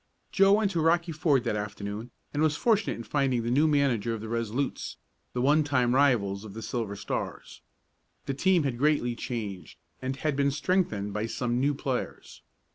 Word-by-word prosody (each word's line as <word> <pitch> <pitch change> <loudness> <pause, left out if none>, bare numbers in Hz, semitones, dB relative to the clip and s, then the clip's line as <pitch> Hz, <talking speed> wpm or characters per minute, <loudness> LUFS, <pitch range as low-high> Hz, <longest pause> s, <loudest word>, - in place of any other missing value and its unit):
Joe 195 0 +5
went 205 -1 +3
to 170 -3 0
Rocky 170 +1 +2
Ford 150 -5 +2
that 115 -4 -1
afternoon, 105 +2 -5 0.2
and 145 - 0
was 155 -1 +2
fortunate 220 -3 +2
in 115 - -7
finding 130 -3 0
the 120 - -1
new 145 +5 +4
manager 130 -7 +1
of 110 - -7
the 110 - -6
Resolutes, 115 +4 -2 0.4
the 125 - -1
one 150 +3 +4
time 130 -4 +2
rivals 115 -8 +2
of 105 -2 -10
the 110 - -6
Silver 110 -2 -3
Stars. - - -5 0.6
The 135 - -2
team 175 +4 +3
had 130 -4 -2
greatly 145 -5 +2
changed, 105 - -5 0.2
and 130 +1 -2
had 150 +1 -1
been 140 0 +2
strengthened 140 - 0
by 105 +2 -2
some 120 +1 -1
new 140 +2 +2
players. 135 -3 -4
130 Hz, 185 wpm, -28 LUFS, 115-150 Hz, 0.6 s, Joe